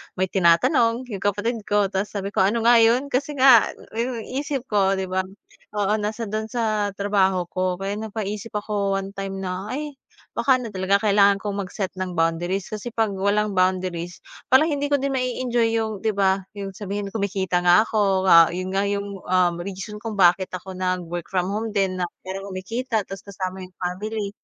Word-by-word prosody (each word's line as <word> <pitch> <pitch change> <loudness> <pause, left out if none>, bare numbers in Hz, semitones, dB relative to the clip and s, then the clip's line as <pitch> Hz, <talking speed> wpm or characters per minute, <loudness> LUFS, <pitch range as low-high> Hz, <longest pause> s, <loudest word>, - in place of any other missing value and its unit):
may 185 0 -1
tinatanong 230 - +3
'yung 195 - -4
kapatid 205 +4 -1
ko, 205 -1 +2
tapos 195 +2 -1
sabi 200 0 -3
ko, - - -1
"ano 215 +4 +2
nga 235 0 +6
'yun?" 245 +5 +3
kasi 285 +3 -1
nga 260 -4 +7 0.2
'yung 230 0 -3
isip 275 -1 -3
ko 195 -1 +3
'di 190 - -2
ba 190 - +1 0.6
oo, 205 0 +1
nasa 215 +2 -3
do'n 215 +1 -2
sa 215 -4 0
trabaho 190 -3 +1
ko. 185 0 -2
Kaya 200 +2 -2
napaisip 215 0 -5
ako, 205 -1 -1
one 195 0 -2
time 195 0 -4
na, 185 +1 -4
"Ay, 295 -1 -5 0.4
baka 255 +1 +3
ano 230 - -5
talaga 195 0 +1
kailangan 200 -1 +4
kong 200 -2 -3
mag-set 190 +1 -4
ng 185 -1 -3
boundaries." 175 +3 -1
Kasi 215 +2 -6
'pag 225 -2 +1
walang 200 0 +1
boundaries, 185 -2 0 0.3
parang 310 +5 +6
hindi 285 -1 -1
ko 285 -2 +2
din 275 - 0
mai-enjoy 245 -2 0
'yung 220 -2 -1
'di 220 -1 +1
ba, 190 -1 +1
'yung 195 -2 -7
sabihin 200 0 -4
kumikita 190 -4 -1
nga 175 +4 +7
ako, 195 -3 +2
ah, 165 -1 +8
'yun 185 +1 -3
nga 195 +1 +1
'yung, 200 0 -3
ah, 180 -1 +3 0.2
reason 200 +2 -6
kung 220 0 -5
bakit 185 +1 +4
ako 185 +1 -7
nag-work 180 -2 -2
from 185 0 0
home 220 +2 -2
din 190 -2 0
na 180 - 0 0.2
para 190 +1 -6
kumikita 220 +5 -2
tapos 195 0 -8
kasama 185 -1 -5
'yung 180 - -18
family. 200 +3 -3
200 Hz, 185 wpm, -23 LUFS, 185-220 Hz, 0.6 s, ah